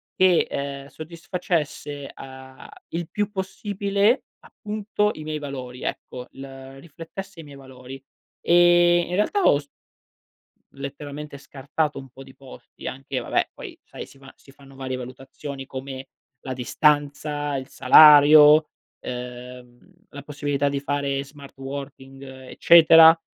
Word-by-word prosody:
che, 185 Hz, -2 st, +3 dB
ehm, 140 Hz, 0 st, -5 dB
soddisfacesse, 155 Hz, -3 st, -5 dB
uhm, 130 Hz, 0 st, -12 dB, 0.3 s
il 170 Hz, -1 st, -3 dB
più 205 Hz, +3 st, -3 dB
possibile, 200 Hz, +3 st, -1 dB, 0.2 s
appunto 210 Hz, -1 st, -3 dB
i -, -, -10 dB
miei 155 Hz, 0 st, -4 dB
valori, 130 Hz, -4 st, -8 dB
ecco, 125 Hz, 0 st, -6 dB
l 135 Hz, -, -10 dB, 0.3 s
riflettesse 170 Hz, +5 st, -10 dB
i -, -, -13 dB
miei 145 Hz, -2 st, -13 dB
valori. 130 Hz, 0 st, -12 dB, 0.4 s
E 175 Hz, 0 st, +4 dB
in -, -, -5 dB
realtà 290 Hz, -, 0 dB
ho 145 Hz, -, +4 dB
s 145 Hz, -, -14 dB, 1.1 s
letteralmente 140 Hz, +1 st, -8 dB
scartato 140 Hz, +2 st, -4 dB
un 135 Hz, -1 st, -12 dB
po' 130 Hz, +2 st, -15 dB
di 135 Hz, -1 st, -17 dB
posti, 135 Hz, -1 st, -15 dB
anche 135 Hz, +1 st, -6 dB
vabbè -, -, -1 dB
poi -, -, -10 dB
sai, -, -, -10 dB
si -, -, -19 dB
va 135 Hz, -1 st, -14 dB
si 135 Hz, -, -20 dB
fanno 135 Hz, 0 st, -18 dB
varie 130 Hz, -1 st, -5 dB
valutazioni 135 Hz, +2 st, -9 dB
come 130 Hz, 0 st, -8 dB, 0.3 s
la 130 Hz, -, -5 dB
distanza, 145 Hz, +2 st, 0 dB
il 130 Hz, -1 st, -5 dB
salario, 150 Hz, +2 st, +7 dB, 0.3 s
ehm, 125 Hz, 0 st, -9 dB, 0.3 s
la 145 Hz, -, -10 dB
possibilità 145 Hz, -1 st, -2 dB
di 140 Hz, 0 st, -3 dB
fare 140 Hz, -1 st, -2 dB
smart 140 Hz, -1 st, -15 dB
working 135 Hz, 0 st, -9 dB
eccetera. 160 Hz, +5 st, +5 dB
140 Hz, 130 wpm, -23 LUFS, 135-160 Hz, 1.1 s, salario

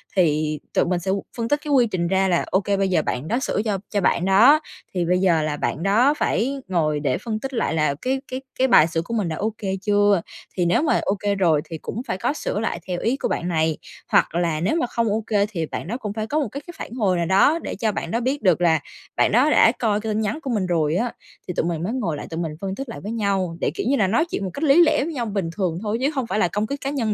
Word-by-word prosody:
thì 155 Hz, -4 st, +1 dB
tụi -, -, +3 dB
mình 175 Hz, 0 st, 0 dB
sẽ 190 Hz, +2 st, -2 dB, 0.3 s
phân 230 Hz, -, -1 dB
tích 290 Hz, +4 st, +1 dB
cái 300 Hz, -, -4 dB
quy 245 Hz, -3 st, +5 dB
trình 175 Hz, -4 st, -1 dB
ra 190 Hz, +1 st, +2 dB
là 175 Hz, -2 st, +2 dB
ô 190 Hz, -, +4 dB
kê 200 Hz, 0 st, 0 dB
bây 195 Hz, 0 st, +1 dB
giờ 175 Hz, -4 st, +2 dB
bạn 130 Hz, 0 st, -3 dB
đó 235 Hz, -, 0 dB
sửa 210 Hz, -, 0 dB
cho 210 Hz, -3 st, 0 dB
cho 205 Hz, -1 st, 0 dB
bạn 175 Hz, -1 st, +2 dB
đó 225 Hz, +11 st, +6 dB, 0.3 s
thì 180 Hz, -2 st, 0 dB
bây 180 Hz, +2 st, +2 dB
giờ 175 Hz, -4 st, +3 dB
là 150 Hz, -1 st, -2 dB
bạn 155 Hz, -, -2 dB
đó 230 Hz, +9 st, +4 dB
phải 270 Hz, +1 st, 0 dB
ngồi 155 Hz, -5 st, 0 dB
để 140 Hz, -3 st, 0 dB
phân 215 Hz, +1 st, -4 dB
tích 270 Hz, +4 st, -6 dB
lại 230 Hz, -8 st, 0 dB
là 150 Hz, -3 st, +1 dB
cái 265 Hz, +1 st, -1 dB
cái 255 Hz, +1 st, -3 dB, 0.2 s
cái 260 Hz, -, +4 dB
bài 165 Hz, -10 st, +6 dB
sửa 165 Hz, 0 st, -1 dB
của 170 Hz, -, -7 dB
mình 210 Hz, -6 st, 0 dB
đã 160 Hz, -, -3 dB
ô 215 Hz, +5 st, -2 dB
kê 195 Hz, -2 st, -3 dB
chưa. 205 Hz, -2 st, +3 dB, 0.4 s
Thì 180 Hz, -, +2 dB
nếu 175 Hz, +7 st, +3 dB
mà 315 Hz, -, +2 dB
ô 195 Hz, -, 0 dB
kê 205 Hz, -1 st, 0 dB
rồi 165 Hz, -6 st, +3 dB
thì 160 Hz, +1 st, -7 dB
cũng 215 Hz, +8 st, -5 dB
phải -, -, -2 dB
có 235 Hz, -, 0 dB
sửa 210 Hz, -, -3 dB
lại 220 Hz, -6 st, -2 dB
theo 180 Hz, -1 st, -2 dB
ý 245 Hz, +4 st, 0 dB
của -, -, -1 dB
bạn 170 Hz, -, -2 dB
này 160 Hz, -2 st, +1 dB, 0.3 s
hoặc 165 Hz, -, +3 dB
là 170 Hz, -3 st, 0 dB
nếu 185 Hz, -, 0 dB
mà 325 Hz, -7 st, 0 dB
không 230 Hz, -1 st, -1 dB
ô 215 Hz, +1 st, -1 dB
kê 205 Hz, -2 st, +2 dB
thì 165 Hz, -6 st, -3 dB
bạn 160 Hz, -, -6 dB
đó 230 Hz, -, -3 dB
cũng 210 Hz, -6 st, -5 dB
phải 215 Hz, 0 st, -3 dB
có 300 Hz, +6 st, 0 dB
một 290 Hz, -, 0 dB
cái 280 Hz, +4 st, -6 dB
cái 345 Hz, -, -8 dB
phản -, -, -7 dB
hồi 200 Hz, -7 st, +1 dB
nào 170 Hz, -, 0 dB
đó 195 Hz, -, +4 dB
để -, -, -5 dB
cho 220 Hz, -2 st, 0 dB
bạn 175 Hz, -, -4 dB
đó 230 Hz, -, +1 dB
biết 265 Hz, +4 st, -1 dB
được 180 Hz, -4 st, +3 dB
là 160 Hz, -2 st, +4 dB, 0.4 s
bạn -, -, +3 dB
đó 255 Hz, +7 st, +4 dB
đã 225 Hz, -, +6 dB
coi 210 Hz, -3 st, +1 dB
cái 220 Hz, -, -4 dB
tin 215 Hz, -, 0 dB
nhắn 215 Hz, +7 st, -2 dB
của 275 Hz, -, -5 dB
mình 210 Hz, -5 st, 0 dB
rồi 165 Hz, -3 st, +1 dB
á. 235 Hz, +5 st, -1 dB, 0.3 s
Thì 180 Hz, -, -3 dB
tụi -, -, -1 dB
mình 170 Hz, -1 st, -2 dB
mới 205 Hz, +6 st, -2 dB
ngồi 190 Hz, -, -2 dB
lại -, -, -7 dB
tụi 165 Hz, -, -4 dB
mình 165 Hz, -2 st, -2 dB
phân 195 Hz, -1 st, -3 dB
tích 270 Hz, +2 st, -6 dB
lại 230 Hz, -, -7 dB
với 210 Hz, -, -5 dB
nhau 195 Hz, -6 st, -1 dB
để, -, -, +1 dB
kiểu -, -, -3 dB
như 280 Hz, -, +3 dB
là, 200 Hz, -, +3 dB
nói 235 Hz, -, +2 dB
chuyện -, -, -2 dB
một 190 Hz, -, -3 dB
cách 280 Hz, -, -5 dB
lý 310 Hz, +3 st, +6 dB
lẽ 310 Hz, -4 st, +2 dB
với 325 Hz, +3 st, -4 dB
nhau 245 Hz, -5 st, -2 dB
bình 195 Hz, -6 st, -2 dB
thường 175 Hz, -4 st, -1 dB
thôi 215 Hz, +1 st, -1 dB
chứ 275 Hz, -, +2 dB
hông 260 Hz, -4 st, -1 dB
phải 215 Hz, -, -1 dB
là 180 Hz, -, +3 dB
công 205 Hz, +4 st, -2 dB
kích 280 Hz, +3 st, -5 dB
cá 270 Hz, -, -2 dB
nhân 240 Hz, -7 st, -1 dB
200 Hz, 305 wpm, -22 LUFS, 175-235 Hz, 0.4 s, đó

